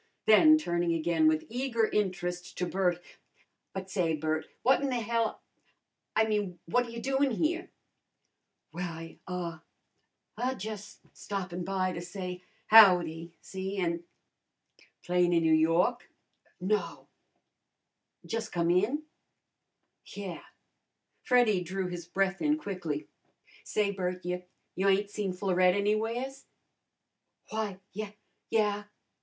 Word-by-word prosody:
Then 310 Hz, +9 st, +8 dB
turning 175 Hz, -, 0 dB
again 165 Hz, -1 st, +2 dB
with 155 Hz, 0 st, +2 dB
eager 240 Hz, -1 st, 0 dB
interest 180 Hz, -4 st, -2 dB
to 180 Hz, -, 0 dB
Bert, 180 Hz, -1 st, +1 dB, 0.7 s
"But 190 Hz, 0 st, -6 dB
say, 170 Hz, -4 st, +1 dB
Bert, 155 Hz, +1 st, -2 dB, 0.2 s
what 265 Hz, +2 st, +4 dB
in 280 Hz, -, 0 dB
the 250 Hz, -2 st, 0 dB
hell 230 Hz, 0 st, -1 dB, 0.7 s
a -, -, +5 dB
I 220 Hz, -, +3 dB
mean 205 Hz, -5 st, -1 dB
what 245 Hz, +9 st, +2 dB
ta -, -, -10 dB
you 230 Hz, 0 st, -6 dB
doin' 270 Hz, +3 st, +1 dB
here?" 335 Hz, -, -1 dB, 1.0 s
"Why 165 Hz, -2 st, -6 dB
ah 175 Hz, -3 st, -4 dB, 0.8 s
ah 255 Hz, +2 st, 0 dB
jus' 210 Hz, -1 st, -7 dB
stoppin' 185 Hz, -3 st, -4 dB
by 185 Hz, 0 st, 0 dB
to 170 Hz, -, -5 dB
say 180 Hz, 0 st, -6 dB, 0.2 s
howdy, 175 Hz, -6 st, +6 dB
see, 190 Hz, +1 st, -5 dB
an' 170 Hz, -2 st, -1 dB, 0.5 s
" -, -, -31 dB
"Playin'in 175 Hz, -1 st, +3 dB
N'Yawk?" 165 Hz, +9 st, +3 dB, 0.5 s
"No." 205 Hz, +4 st, -1 dB, 1.2 s
"Jus'come 175 Hz, -7 st, -1 dB
in?" 215 Hz, -, +2 dB, 1.0 s
"Yeah." 195 Hz, -4 st, -7 dB, 0.8 s
Freddy 240 Hz, -7 st, +3 dB
drew 185 Hz, +1 st, -3 dB
his 175 Hz, -1 st, -6 dB
breath 195 Hz, +1 st, 0 dB
in 300 Hz, 0 st, +3 dB
quickly. 180 Hz, -, -4 dB, 0.6 s
"Say, 210 Hz, -1 st, 0 dB
Bert, 180 Hz, -2 st, -3 dB
you 180 Hz, 0 st, -3 dB, 0.3 s
you 195 Hz, +2 st, +2 dB
ain't 200 Hz, +1 st, +2 dB
seen 205 Hz, -3 st, -2 dB
Florette 185 Hz, -1 st, +2 dB
anywheres?" 225 Hz, +6 st, -1 dB, 1.0 s
"Why, 215 Hz, -3 st, -3 dB
ye 210 Hz, +1 st, -5 dB, 0.3 s
yeah." 210 Hz, -2 st, +1 dB
190 Hz, 120 wpm, -30 LUFS, 175-220 Hz, 1.2 s, Then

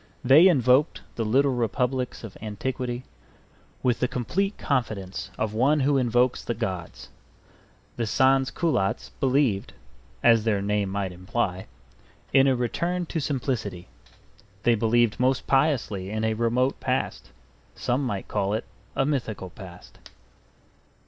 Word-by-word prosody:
They 140 Hz, +8 st, +7 dB
invoked 135 Hz, -2 st, +3 dB
the 115 Hz, -, -2 dB
little 135 Hz, +5 st, +3 dB
republics 125 Hz, +2 st, -1 dB
of 110 Hz, -4 st, -8 dB
antiquity 120 Hz, +3 st, -4 dB, 0.8 s
with 125 Hz, -2 st, +2 dB
the 125 Hz, -, +1 dB
complete 190 Hz, -, -2 dB
confidence 110 Hz, -8 st, -2 dB
of 110 Hz, -1 st, -2 dB
one 140 Hz, +7 st, +3 dB
who 140 Hz, 0 st, +3 dB
invokes 125 Hz, 0 st, +2 dB
the 120 Hz, -, -3 dB
gods. 95 Hz, -7 st, -5 dB, 0.9 s
The 115 Hz, -2 st, -1 dB
Sans 135 Hz, +3 st, +3 dB
culottes 145 Hz, -, -1 dB
believed 130 Hz, -7 st, +1 dB, 0.5 s
(as 115 Hz, -2 st, +5 dB
their 110 Hz, -3 st, +1 dB
name 100 Hz, 0 st, 0 dB
might 95 Hz, -1 st, -2 dB
imply) 95 Hz, +1 st, -3 dB, 0.7 s
in 135 Hz, 0 st, +6 dB
a 135 Hz, -, +3 dB
return 170 Hz, +9 st, -1 dB
to 165 Hz, -, -3 dB
simplicity. 120 Hz, -, -3 dB, 0.7 s
They 120 Hz, -, +4 dB
believed 115 Hz, 0 st, +2 dB
most 130 Hz, +1 st, +1 dB
piously 130 Hz, -9 st, +1 dB
in 110 Hz, +1 st, -2 dB
a 110 Hz, 0 st, +1 dB
remote 120 Hz, +4 st, +1 dB
past; -, -, -2 dB, 0.5 s
some 125 Hz, +4 st, -1 dB
might 100 Hz, -7 st, -3 dB
call 100 Hz, +2 st, 0 dB
it 110 Hz, -, -3 dB, 0.3 s
a 135 Hz, -, +2 dB
mythical 115 Hz, -10 st, -3 dB
past. 90 Hz, -2 st, -13 dB
120 Hz, 130 wpm, -25 LUFS, 105-135 Hz, 0.9 s, They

